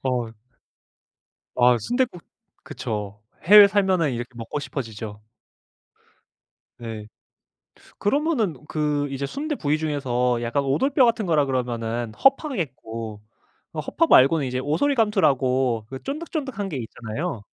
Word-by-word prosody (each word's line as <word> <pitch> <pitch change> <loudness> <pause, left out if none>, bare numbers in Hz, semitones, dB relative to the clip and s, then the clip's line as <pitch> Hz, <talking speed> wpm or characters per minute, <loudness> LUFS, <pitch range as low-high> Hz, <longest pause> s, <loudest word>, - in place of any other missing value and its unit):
어. 125 -3 -1 1.2
아 125 0 +5
순댓국 240 - -1 0.4
그쵸. 105 -1 -5 0.2
해외 205 +4 +10
살면은 190 -7 +2
이렇게 120 +1 -5
먹고 115 +5 -5
싶어지죠. 110 -7 -6 1.6
예. 110 -2 -7 0.9
그러면은 240 - 0
그 150 -2 0
이제 140 0 -3
순대 300 - -3
부위 150 - 0
중에서 125 -6 0
약간 120 +4 0
오돌뼈 265 - +3
같은 230 -3 +1
거라 155 -4 +3
그러면은 120 -3 -2
허파겠고 130 - -1 0.5
어 - - -2
허파 330 - 0
말고는 140 - +5
이제 125 0 -2
오소리감투라고 140 - +1
그 130 0 -7
쫀득쫀득한 275 - -4
게 145 - -4
있잖아요. 120 - -5
140 Hz, 270 characters per minute, -23 LUFS, -, 1.6 s, 해외